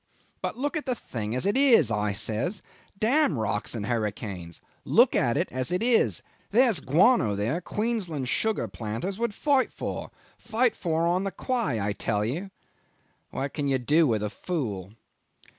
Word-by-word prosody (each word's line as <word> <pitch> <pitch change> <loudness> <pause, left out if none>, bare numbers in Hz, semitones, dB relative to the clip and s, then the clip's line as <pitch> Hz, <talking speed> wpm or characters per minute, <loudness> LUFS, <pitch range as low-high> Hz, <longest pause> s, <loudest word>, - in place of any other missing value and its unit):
'But - - -3
look 285 +4 -2
at 305 -2 -3
the 255 - +1
thing 115 - -5
as 130 - -1
it 200 - +2
is,' 255 - +5 0.3
says 125 - -1
I. - - -29
'Damn 250 - +3
rocks 110 +1 -1
and 105 -3 -3
hurricanes. 100 -6 -3 0.2
Look - - +4
at - - +2
it - - +1
as 130 +2 -2
it 180 +5 0
is. 240 -1 +2 0.3
There's 230 - +4
guano 150 - +3
there 115 - -1
Queensland 190 - -2
sugar 220 - 0
planters 115 - -5
would 235 -3 -1
fight 280 -3 +2
for - - -5 0.3
fight 235 +1 +1
for 165 -1 0
on 180 +2 +1
the 195 - -2
quay, 235 - -1
I 100 0 -1
tell 105 +1 -1
you.'... 165 - -3 0.8
What 140 +1 -4
can 145 -2 -2
you 135 -1 +2
do 150 +6 +3
with 110 -4 0
a 105 - -2
fool? 110 - -4
160 Hz, 170 wpm, -27 LUFS, -, 0.8 s, is